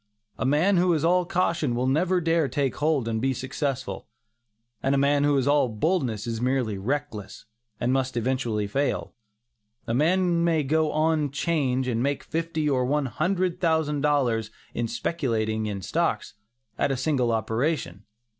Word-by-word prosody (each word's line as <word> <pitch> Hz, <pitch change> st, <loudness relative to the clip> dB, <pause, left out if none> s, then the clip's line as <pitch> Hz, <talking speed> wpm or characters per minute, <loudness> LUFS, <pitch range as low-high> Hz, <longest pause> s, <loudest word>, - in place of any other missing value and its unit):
A 125 Hz, -, 0 dB
man 165 Hz, +8 st, +3 dB
who 180 Hz, +1 st, +3 dB
is 160 Hz, -1 st, 0 dB
all 180 Hz, +1 st, +3 dB
caution, 170 Hz, -7 st, 0 dB
will 125 Hz, +1 st, 0 dB
never 175 Hz, +7 st, +2 dB
dare 165 Hz, -2 st, +2 dB
to 130 Hz, -, -11 dB
take 140 Hz, -3 st, 0 dB
hold 150 Hz, -5 st, +1 dB
and 110 Hz, -1 st, -1 dB
be 135 Hz, 0 st, +1 dB
successful; 130 Hz, +1 st, -3 dB, 0.7 s
and 135 Hz, +1 st, +1 dB
a -, -, +2 dB
man 140 Hz, +1 st, +3 dB
who 145 Hz, -1 st, +3 dB
is 135 Hz, 0 st, +1 dB
all 145 Hz, -3 st, +3 dB
boldness, 115 Hz, -, -1 dB
is 115 Hz, -1 st, -3 dB
merely 125 Hz, -4 st, 0 dB
reckless, 110 Hz, -3 st, -4 dB, 0.3 s
and 125 Hz, +2 st, +1 dB
must 130 Hz, -2 st, -1 dB
eventually 120 Hz, -3 st, 0 dB
fail. 135 Hz, +8 st, -1 dB, 0.7 s
A 115 Hz, -, -2 dB
man 170 Hz, +5 st, +2 dB
may 165 Hz, -3 st, +2 dB
go 155 Hz, +3 st, +1 dB
on 155 Hz, -1 st, +1 dB
"'change" 135 Hz, -3 st, 0 dB
and 115 Hz, -2 st, 0 dB
make 140 Hz, +2 st, -1 dB
fifty 160 Hz, -1 st, -2 dB
or 130 Hz, -3 st, +2 dB
one 145 Hz, +3 st, +1 dB
hundred 180 Hz, +6 st, -1 dB
thousand 160 Hz, -4 st, +1 dB
dollars 125 Hz, -7 st, +1 dB, 0.2 s
in 120 Hz, -, -1 dB
speculating 110 Hz, -5 st, -1 dB
in 100 Hz, -2 st, -4 dB
stocks, -, -, -1 dB, 0.5 s
at -, -, +2 dB
a 135 Hz, -, -1 dB
single 130 Hz, -3 st, +1 dB
operation. 110 Hz, -, -1 dB
140 Hz, 165 wpm, -25 LUFS, 120-160 Hz, 0.7 s, man